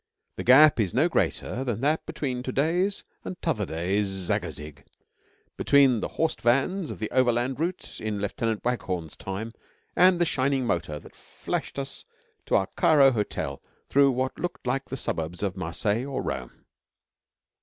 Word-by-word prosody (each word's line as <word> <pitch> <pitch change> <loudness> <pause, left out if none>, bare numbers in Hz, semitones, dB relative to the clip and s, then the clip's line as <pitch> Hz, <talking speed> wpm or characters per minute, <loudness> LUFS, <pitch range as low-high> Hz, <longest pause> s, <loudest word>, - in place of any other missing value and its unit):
The - - -3
gap 140 +3 +7
is 100 -3 0
no 150 +7 +4
greater 130 -6 -1
than 120 -3 -2
that 150 +3 +1
between 130 -4 -3
to 130 - -4
day's 175 +9 +1 0.2
and 180 - -6
t'other 110 - -1
day's 95 +6 0
Zagazig 85 -5 -3 0.7
between 135 -5 +4
the - - -2
horsed 160 0 0
vans 140 +9 +1
of - - -6
the 110 - -4
Overland 125 +1 +1
Route 175 +3 -4
in 105 -2 -2
Lieutenant 110 +2 -2
Waghorn's 90 -10 -2
time 105 +4 -5 0.4
and 180 0 +6
the 175 - +4
shining 135 -3 +1
motor 85 -7 -1
that - - -16
flashed - - -5
us 140 0 -5 0.4
to - - +2
our 95 - +3
Cairo 140 -4 +5
hotel 100 - -3 0.3
through 140 0 +5
what 130 0 -2
looked 175 -5 -4
like 135 +2 -1
the 135 - -6
suburbs 80 -4 -3
of 95 -2 -1
Marseilles 100 +7 -1
or 140 - -3
Rome. - - -6
125 Hz, 160 wpm, -26 LUFS, 100-140 Hz, 0.7 s, gap